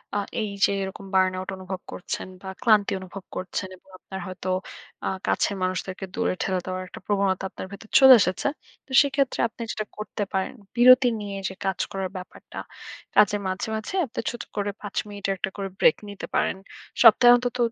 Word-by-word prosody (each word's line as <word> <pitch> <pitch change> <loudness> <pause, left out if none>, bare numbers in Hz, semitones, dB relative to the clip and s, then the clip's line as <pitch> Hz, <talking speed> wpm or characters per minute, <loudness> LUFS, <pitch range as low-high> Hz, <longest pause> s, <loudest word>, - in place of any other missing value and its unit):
আ - - +2 0.2
এই 215 - -2 0.2
যে - - +1
এরকম 190 +1 -6
burn 185 0 +4
out 185 - -6
অনুভব 185 0 -6
করছেন 180 - -5
বা 190 - -9
ক্লান্তি 215 -4 +4
অনুভব 190 +1 -9
করছেন। 185 +1 -3
এবং - - -32
আপনার 190 +1 -8
হয়তো 185 0 -5 0.6
আ - - 0 0.2
কাছের 200 - +1
মানুষদেরকে 185 +1 -3
দূরে 230 -4 +1
ঠেলে 190 -1 0
দেওয়ার 185 0 -3
একটা - - -10
প্রবণতা 195 -2 +1
আপনার - - -7
ভেতরে 205 +2 -11
চলে 265 -1 +10
এসেছে। 185 +6 0 0.4
তো - - -17
সেক্ষেত্রে 275 -2 0
আপনি 230 +1 -13
যেটা 215 - -3
করতে 210 0 -4
পারেন, 190 -1 -1 0.2
বিরতি 255 +1 +7
নিয়ে 200 -1 -5
যে - - -8
কাজ 190 -2 -1
করার 190 -1 -3
ব্যাপারটা। 185 0 -10 0.6
কাজের 205 0 +5
মাঝে, 185 +3 -2
মাঝে 220 - -5
আপনি 255 0 -7
ছোট 240 - -6
করে 205 0 -1
৫ 205 -2 -8
মিনিটের 200 -1 -3
একটা 185 - -2
করে 195 -1 -3
ব্রেক - - +6
নিতে 200 - -7
পারেন। - - +1 0.4
সপ্তাহে 240 +1 +8
অন্তত 245 0 -1
200 Hz, 185 wpm, -25 LUFS, 185-220 Hz, 0.6 s, চলে